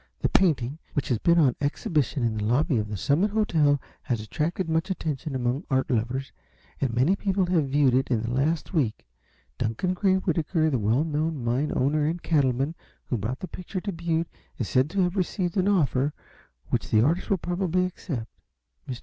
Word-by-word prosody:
The -, -, +1 dB
painting, 150 Hz, -6 st, +2 dB
which 145 Hz, -, -1 dB
has 120 Hz, -4 st, +1 dB
been 170 Hz, 0 st, +4 dB
on 140 Hz, -7 st, +4 dB
exhibition 145 Hz, -2 st, 0 dB
in 115 Hz, -1 st, +1 dB
the 105 Hz, -, -2 dB
lobby 130 Hz, -, +2 dB
of 105 Hz, -, -2 dB
the 105 Hz, -1 st, -4 dB
Summit 155 Hz, -, +2 dB
Hotel, 160 Hz, -9 st, +2 dB, 0.2 s
has 120 Hz, -3 st, -2 dB
attracted 160 Hz, -, -2 dB
much 160 Hz, +4 st, 0 dB
attention 155 Hz, -5 st, -3 dB
among 125 Hz, +4 st, -1 dB
art 130 Hz, +1 st, +1 dB
lovers, 125 Hz, +3 st, -1 dB, 0.5 s
and 135 Hz, -4 st, 0 dB
many 130 Hz, +11 st, +3 dB
people 195 Hz, -1 st, 0 dB
have 170 Hz, -5 st, +1 dB
viewed 140 Hz, -2 st, +3 dB
it 130 Hz, +1 st, +2 dB
in 115 Hz, -3 st, +1 dB
the 115 Hz, -, -3 dB
last 150 Hz, +8 st, 0 dB
week. 125 Hz, -, 0 dB, 0.5 s
Duncan 115 Hz, -, 0 dB
Gray 190 Hz, +1 st, +2 dB
Whitaker, 165 Hz, -3 st, +1 dB
the 130 Hz, -, +1 dB
well 110 Hz, +7 st, +2 dB
known 155 Hz, -3 st, -1 dB
mine 125 Hz, +6 st, 0 dB
owner 145 Hz, +3 st, +2 dB
and 170 Hz, +3 st, -1 dB
cattleman, 140 Hz, -1 st, +1 dB, 0.4 s
who 120 Hz, -, +2 dB
brought 115 Hz, +6 st, -3 dB
the 185 Hz, -, -4 dB
picture 185 Hz, +2 st, -6 dB
to 200 Hz, -, -3 dB
Butte, 165 Hz, -1 st, -1 dB, 0.3 s
is 120 Hz, -, -2 dB
said 130 Hz, +7 st, +2 dB
to 195 Hz, +3 st, 0 dB
have 180 Hz, +1 st, +1 dB
received 185 Hz, -2 st, -1 dB
an 190 Hz, -1 st, +2 dB
offer 145 Hz, -7 st, +2 dB, 0.6 s
which -, -, -1 dB
the 110 Hz, 0 st, +4 dB
artist 165 Hz, +7 st, +1 dB
will 195 Hz, -, +3 dB
probably 180 Hz, +1 st, 0 dB
accept. 145 Hz, -, -5 dB, 0.6 s
Mr. 125 Hz, -1 st, -4 dB
150 Hz, 190 wpm, -26 LUFS, 125-175 Hz, 0.6 s, been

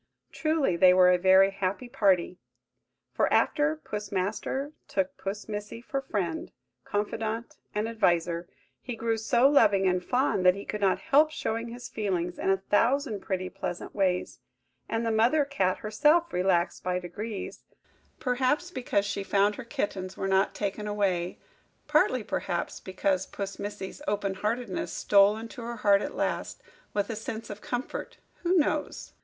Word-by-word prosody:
Truly, 310 Hz, -, +1 dB
they 180 Hz, +1 st, +6 dB
were 180 Hz, -1 st, +7 dB
a 180 Hz, -, +3 dB
very 190 Hz, +1 st, +6 dB
happy 195 Hz, +5 st, -3 dB
party; 195 Hz, -8 st, +2 dB, 0.7 s
for -, -, +1 dB
after 300 Hz, +1 st, +3 dB
Puss 210 Hz, -9 st, -6 dB
Master 215 Hz, +9 st, -2 dB, 0.2 s
took 190 Hz, -1 st, -1 dB
Puss 200 Hz, +2 st, -5 dB
Missy 210 Hz, +1 st, -5 dB
for 270 Hz, +3 st, -3 dB
friend, 185 Hz, -10 st, -3 dB, 0.3 s
confidante, 220 Hz, +2 st, -3 dB, 0.2 s
and 210 Hz, +1 st, 0 dB
adviser, 175 Hz, -6 st, +1 dB, 0.3 s
he 245 Hz, -, -5 dB
grew 230 Hz, 0 st, 0 dB
so 235 Hz, +3 st, +3 dB
loving 205 Hz, -9 st, +4 dB
and 180 Hz, 0 st, +1 dB
fond, 250 Hz, -5 st, +1 dB
that 180 Hz, 0 st, +6 dB
he 200 Hz, -, -7 dB
could 210 Hz, -, -4 dB
not 195 Hz, -2 st, +3 dB
help 300 Hz, +3 st, +4 dB
showing 230 Hz, -6 st, -3 dB
his 240 Hz, +1 st, -8 dB
feelings 180 Hz, -5 st, -2 dB
in -, -, 0 dB
a 195 Hz, -, +4 dB
thousand 230 Hz, +4 st, +1 dB
pretty 185 Hz, -1 st, -3 dB
pleasant 175 Hz, -, -5 dB
ways: 185 Hz, -3 st, 0 dB, 0.5 s
and 225 Hz, +1 st, -1 dB
the 225 Hz, -, +1 dB
mother 240 Hz, +7 st, +3 dB
cat 190 Hz, -10 st, 0 dB
herself 300 Hz, +11 st, +2 dB
relaxed 180 Hz, -1 st, +1 dB
by 180 Hz, 0 st, 0 dB
degrees; 195 Hz, +4 st, -6 dB, 0.6 s
perhaps 260 Hz, +7 st, 0 dB
because 245 Hz, -, 0 dB
she 200 Hz, 0 st, -2 dB
found 200 Hz, +1 st, +2 dB
her 260 Hz, -, -7 dB
kittens 200 Hz, -7 st, -4 dB
were 195 Hz, -, -2 dB
not 190 Hz, +1 st, +2 dB
taken 210 Hz, +1 st, -3 dB
away–partly, 205 Hz, -, -1 dB
perhaps, -, -, -3 dB
because 190 Hz, 0 st, -1 dB
Puss 200 Hz, -1 st, -6 dB
Missy's 205 Hz, +3 st, -6 dB
open 200 Hz, -3 st, 0 dB
heartedness 210 Hz, +1 st, -2 dB
stole 200 Hz, +1 st, +4 dB
into 230 Hz, +2 st, -8 dB
her 235 Hz, +1 st, -5 dB
heart 205 Hz, -2 st, +4 dB
at -, -, -5 dB
last, -, -, -2 dB, 0.3 s
with 205 Hz, +1 st, -1 dB
a -, -, -3 dB
sense 220 Hz, +1 st, -6 dB
of 205 Hz, 0 st, -8 dB
comfort–who 345 Hz, +7 st, -3 dB
knows? 300 Hz, -1 st, -1 dB
205 Hz, 155 wpm, -28 LUFS, 190-235 Hz, 0.7 s, were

